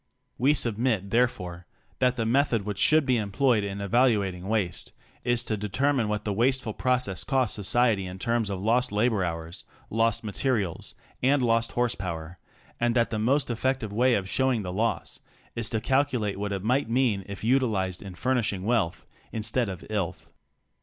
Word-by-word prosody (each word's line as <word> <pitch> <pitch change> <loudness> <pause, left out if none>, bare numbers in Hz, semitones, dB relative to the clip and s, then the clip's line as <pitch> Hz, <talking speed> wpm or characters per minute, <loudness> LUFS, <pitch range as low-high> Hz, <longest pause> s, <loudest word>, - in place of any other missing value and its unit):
We 140 +4 +4
submit 110 -5 0
therefore 90 -8 0 0.3
that 125 -1 +3
the 115 -2 -1
method 120 -2 +2
which 105 -1 -4
should 155 +6 +4
be 125 -3 +2
em 105 -2 -4
ployed 120 +1 +3
in 100 0 -4
evaluating 100 -4 +1
waste, 105 -5 -2 0.3
is 120 0 +1
to 110 - -2
determine 120 +4 0
what 105 0 -2
the 105 - 0
waste 130 +5 +2
ful 110 - -4
process 125 -9 0
costs 130 -5 +1
society 105 -1 +2
in 90 +1 -7
terms 115 +1 0
of 95 -2 -3
lost 120 +5 +1
labor 105 -1 +1
hours, 85 0 -5 0.3
lost 115 +1 +1
materials, 105 - -2 0.3
and 135 +1 +3
lost 115 -1 +1
horsepower, 90 -8 -3 0.4
and 120 0 +1
that 120 -1 +2
the 110 - -1
most 130 +4 +1
effective 120 -2 -1
way 125 +3 +3
of 95 -2 -2
showing 130 0 +1
the 90 -1 -4
loss 115 +4 -2 0.4
is 115 -1 -2
to 110 - 0
calculate 125 -5 0
what 105 0 -2
it 100 -1 -3
might 125 +3 +1
mean 115 -5 +1
if 100 0 -8
utilized 110 -7 +1
in 95 -2 -9
furnishing 115 -5 0
wealth 110 -6 0
— - - -31
instead 115 +1 -1
of 95 - -6
— - - -30
"illth." 100 -6 -2
110 Hz, 180 wpm, -27 LUFS, 100-125 Hz, 0.4 s, We